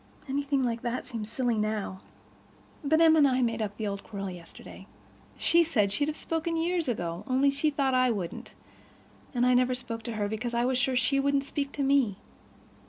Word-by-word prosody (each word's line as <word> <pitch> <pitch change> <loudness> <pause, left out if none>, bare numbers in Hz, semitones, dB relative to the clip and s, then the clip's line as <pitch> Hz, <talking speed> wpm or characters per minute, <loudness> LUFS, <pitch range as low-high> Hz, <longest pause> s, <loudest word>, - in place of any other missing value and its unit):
Anything 275 0 0
like 235 -1 -1
that 240 +1 -3
seems 225 -4 -6
silly 240 -3 0
now. 210 -3 -2 0.8
But 315 +3 +3
Em 320 -1 +7
and 295 -3 +6
I 255 -1 +2
made 230 -1 -1
up 205 -1 -3
the 220 - -3
old 200 -1 -4
quarrel 195 -3 -5
yesterday. 175 -2 -12 0.5
She 340 - +4
said 230 -12 +2
she'd 285 +8 +1
have 310 - -3
spoken 330 0 -2
years 340 0 0
ago, 175 -7 -3
only 270 +2 +3
she 280 +3 +1
thought 275 -2 0
I 255 0 +4
wouldn't. 195 -7 -4 0.8
And 245 0 +3
I 250 - +4
never 250 0 +3
spoke 240 -2 -5
to 235 - -4
her 210 -2 -1
because 235 +3 -3
I 240 +1 +2
was 255 0 +1
sure 265 0 +1
she 275 +2 +2
wouldn't 280 0 +2
speak 280 0 -3
to 285 - -2
me. 270 -8 +2
255 Hz, 200 wpm, -28 LUFS, 220-280 Hz, 0.8 s, Em